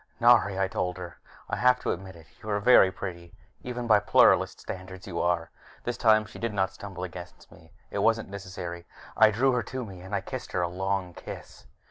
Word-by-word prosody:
"Nari," 115 Hz, -5 st, +5 dB
I 95 Hz, -, +2 dB
told 90 Hz, -1 st, -2 dB
her, 90 Hz, -4 st, -9 dB, 0.3 s
"I -, -, -2 dB
have 125 Hz, 0 st, +4 dB
to -, -, -1 dB
admit 95 Hz, 0 st, -6 dB
it. 80 Hz, -1 st, -15 dB, 0.2 s
You 110 Hz, -, -8 dB
are 105 Hz, -1 st, +1 dB
very 100 Hz, -3 st, +6 dB
pretty 85 Hz, -3 st, -7 dB, 0.3 s
even 125 Hz, -1 st, -5 dB
by 110 Hz, -3 st, +5 dB
Pluralist -, -, +4 dB
standards. 95 Hz, 0 st, -8 dB
You 85 Hz, -3 st, -3 dB
are 85 Hz, -1 st, 0 dB, 0.2 s
" -, -, -23 dB
This 120 Hz, -, -2 dB
time 110 Hz, -1 st, +4 dB
she 110 Hz, -, -12 dB
did 115 Hz, -2 st, -3 dB
not 95 Hz, -1 st, +1 dB
stumble 95 Hz, -3 st, -8 dB
against 90 Hz, 0 st, -9 dB
me. 80 Hz, -1 st, -18 dB, 0.2 s
It -, -, -2 dB
wasn't 115 Hz, 0 st, +2 dB
necessary. 90 Hz, -3 st, -7 dB, 0.3 s
I 110 Hz, 0 st, +7 dB
drew 125 Hz, +6 st, +2 dB
her 125 Hz, -1 st, +1 dB
to 130 Hz, 0 st, -5 dB
me, 95 Hz, -4 st, -10 dB
and 95 Hz, +3 st, -5 dB
I -, -, 0 dB
kissed -, -, -7 dB
her 90 Hz, -, +1 dB
a -, -, +1 dB
long 95 Hz, 0 st, -2 dB
kiss. -, -, -10 dB
95 Hz, 215 wpm, -27 LUFS, 90-110 Hz, 0.3 s, I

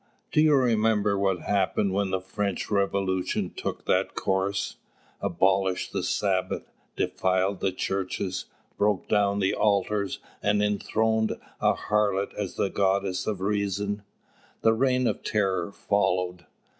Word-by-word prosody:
Do 150 Hz, -, +4 dB
you 155 Hz, -1 st, +5 dB
remember 110 Hz, -5 st, +3 dB
what 95 Hz, -2 st, +1 dB
happened 100 Hz, 0 st, +1 dB
when 100 Hz, 0 st, +1 dB
the 95 Hz, -, 0 dB
French 100 Hz, +2 st, -3 dB
Revolution 100 Hz, -2 st, 0 dB
took -, -, -4 dB
that -, -, +1 dB
course, 95 Hz, +1 st, -1 dB, 0.4 s
abolished 95 Hz, 0 st, +1 dB
the 100 Hz, -, 0 dB
Sabbath, 95 Hz, +1 st, -1 dB, 0.2 s
defiled 95 Hz, +1 st, 0 dB
the 95 Hz, -, 0 dB
Churches, 95 Hz, 0 st, -2 dB, 0.3 s
broke 105 Hz, -2 st, +1 dB
down 100 Hz, -1 st, +2 dB
the 95 Hz, -1 st, +1 dB
altars, 100 Hz, -1 st, +1 dB, 0.2 s
and 105 Hz, 0 st, +2 dB
enthroned 110 Hz, +2 st, +1 dB, 0.3 s
a -, -, +3 dB
harlot 100 Hz, -2 st, 0 dB
as 100 Hz, -3 st, -4 dB
the 100 Hz, -, 0 dB
Goddess 95 Hz, -1 st, 0 dB
of 105 Hz, -3 st, -2 dB
Reason? 100 Hz, 0 st, -1 dB, 0.6 s
The 115 Hz, -, +5 dB
Reign 125 Hz, +2 st, +2 dB
of -, -, 0 dB
Terror 95 Hz, -4 st, 0 dB
followed. 90 Hz, -4 st, 0 dB
100 Hz, 130 wpm, -27 LUFS, 95-105 Hz, 0.6 s, you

